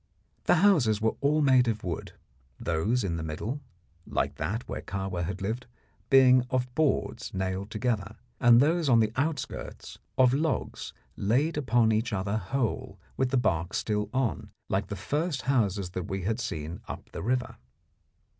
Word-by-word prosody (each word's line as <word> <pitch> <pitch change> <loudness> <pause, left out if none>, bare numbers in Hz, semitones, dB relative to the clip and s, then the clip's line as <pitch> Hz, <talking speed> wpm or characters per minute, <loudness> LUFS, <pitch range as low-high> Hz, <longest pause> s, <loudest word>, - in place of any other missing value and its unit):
The - - +5
houses 125 - +4
were 110 0 +1
all 150 +2 +3
made 130 -3 +5
of 110 -2 -1
wood, 85 -3 -4 0.5
those 100 +10 0
in 85 -4 -1
the - - -4
middle, 105 - -4 0.5
like - - -1
that 110 +5 -3
where - - -4
Kahwa 95 -3 -3
had 95 +3 -4
lived, 115 +5 -3 0.4
being 130 -2 +7
of 125 -1 -1
boards 150 0 0
nailed 95 +1 -2
together, 110 -2 -2 0.2
and 120 -1 +7
those 160 +2 +3
on 120 -2 +6
the 110 -1 +2
outskirts 145 +3 -3 0.2
of 130 -1 +5
logs 155 +3 -1 0.2
laid 130 +11 +1
upon 120 -5 +3
each 110 +1 0
other 100 +2 -1
whole, 115 +4 -2 0.2
with 130 -1 +1
the 135 - +2
bark 85 -5 0
still 105 -1 -1
on, 125 - -1 0.2
like 95 +1 0
the 105 - -4
first 145 - -2
houses 100 -8 +1
that 90 -1 -4
we 95 -1 -3
had 110 +5 -1
seen 85 -9 -4
up - - -8
the - - -6
river. 125 +4 -1
115 Hz, 165 wpm, -28 LUFS, 95-130 Hz, 0.5 s, being